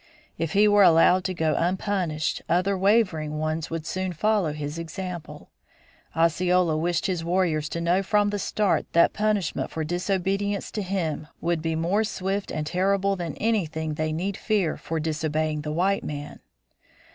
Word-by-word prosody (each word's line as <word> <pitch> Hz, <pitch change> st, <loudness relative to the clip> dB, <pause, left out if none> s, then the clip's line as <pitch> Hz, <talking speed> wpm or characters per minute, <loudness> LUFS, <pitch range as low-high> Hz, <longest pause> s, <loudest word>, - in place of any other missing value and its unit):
If 165 Hz, -1 st, -3 dB
he 210 Hz, +1 st, +5 dB
were 205 Hz, 0 st, +5 dB
allowed 180 Hz, +1 st, +6 dB
to 185 Hz, -, -1 dB
go 160 Hz, -2 st, +1 dB
unpunished 175 Hz, -3 st, -1 dB
other 185 Hz, +4 st, +2 dB
wavering 185 Hz, -7 st, +2 dB
ones 155 Hz, +1 st, -2 dB
would 165 Hz, -1 st, -4 dB
soon 185 Hz, 0 st, -3 dB
follow 205 Hz, -1 st, +1 dB
his 150 Hz, +1 st, -5 dB
example. 175 Hz, +1 st, -7 dB, 0.6 s
Osceola 170 Hz, +1 st, +2 dB
wished 165 Hz, +1 st, 0 dB
his 180 Hz, -3 st, -1 dB
warriors 170 Hz, -3 st, 0 dB
to 170 Hz, -, -3 dB
know 175 Hz, +3 st, +2 dB
from 205 Hz, +1 st, +2 dB
the 205 Hz, -, -2 dB
start 205 Hz, 0 st, 0 dB
that 170 Hz, -, +5 dB
punishment 210 Hz, -5 st, 0 dB
for 160 Hz, -, -3 dB
disobedience 195 Hz, +4 st, -1 dB
to 215 Hz, -, -3 dB
him 175 Hz, -6 st, -2 dB
would 170 Hz, -1 st, -1 dB
be 160 Hz, 0 st, -1 dB
more 175 Hz, +7 st, +1 dB
swift 195 Hz, -1 st, -3 dB
and 155 Hz, -1 st, -3 dB
terrible 195 Hz, +4 st, +1 dB
than 170 Hz, -5 st, -5 dB
anything 160 Hz, -8 st, -1 dB
they 155 Hz, +1 st, -2 dB
need 185 Hz, +6 st, -2 dB
fear 205 Hz, -7 st, 0 dB
for 165 Hz, 0 st, -4 dB
disobeying 155 Hz, -1 st, -1 dB
the 150 Hz, +1 st, -4 dB
white 190 Hz, +5 st, +1 dB
man. 145 Hz, 0 st, -6 dB
175 Hz, 160 wpm, -25 LUFS, 155-195 Hz, 0.6 s, allowed